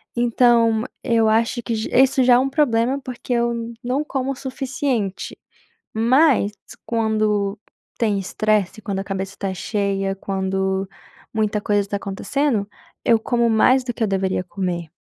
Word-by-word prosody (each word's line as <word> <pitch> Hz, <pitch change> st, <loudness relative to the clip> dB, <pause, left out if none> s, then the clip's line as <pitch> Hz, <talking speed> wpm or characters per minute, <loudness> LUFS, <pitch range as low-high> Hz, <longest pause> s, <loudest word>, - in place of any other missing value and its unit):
Então 235 Hz, -2 st, +3 dB, 0.2 s
eu 225 Hz, -1 st, +2 dB
acho 230 Hz, +2 st, +1 dB
que 230 Hz, -, -2 dB
j 220 Hz, 0 st, -3 dB
isso 265 Hz, -1 st, +3 dB
já 245 Hz, -, +6 dB
é 245 Hz, -, +5 dB
um 270 Hz, -, +1 dB
problema, 260 Hz, -2 st, +1 dB
porque 250 Hz, 0 st, -5 dB
eu 235 Hz, -1 st, -1 dB
não 255 Hz, +4 st, 0 dB
como 270 Hz, -2 st, -2 dB
o -, -, -4 dB
suficiente, 260 Hz, -6 st, -3 dB, 0.6 s
mas 240 Hz, -1 st, +3 dB, 0.3 s
quando 215 Hz, -3 st, 0 dB, 0.4 s
tem 210 Hz, -4 st, +1 dB
estresse, 210 Hz, +1 st, 0 dB
quando 195 Hz, -2 st, -3 dB
a 195 Hz, -, -3 dB
cabeça 195 Hz, 0 st, -4 dB
tá 195 Hz, -1 st, -2 dB
cheia, 195 Hz, 0 st, -1 dB
quando 190 Hz, 0 st, -2 dB, 0.5 s
muita 215 Hz, -1 st, 0 dB
coisa 205 Hz, -1 st, +1 dB
tá 205 Hz, -, -1 dB
acontecendo, 205 Hz, +3 st, -1 dB, 0.4 s
eu 230 Hz, -1 st, +4 dB
como 235 Hz, +1 st, +1 dB
mais 255 Hz, +4 st, +4 dB
do 250 Hz, -, -3 dB
que 230 Hz, -, -2 dB
eu 220 Hz, -, +2 dB
deveria 190 Hz, -1 st, 0 dB
comer. 180 Hz, -3 st, -4 dB
220 Hz, 150 wpm, -21 LUFS, 200-245 Hz, 0.6 s, já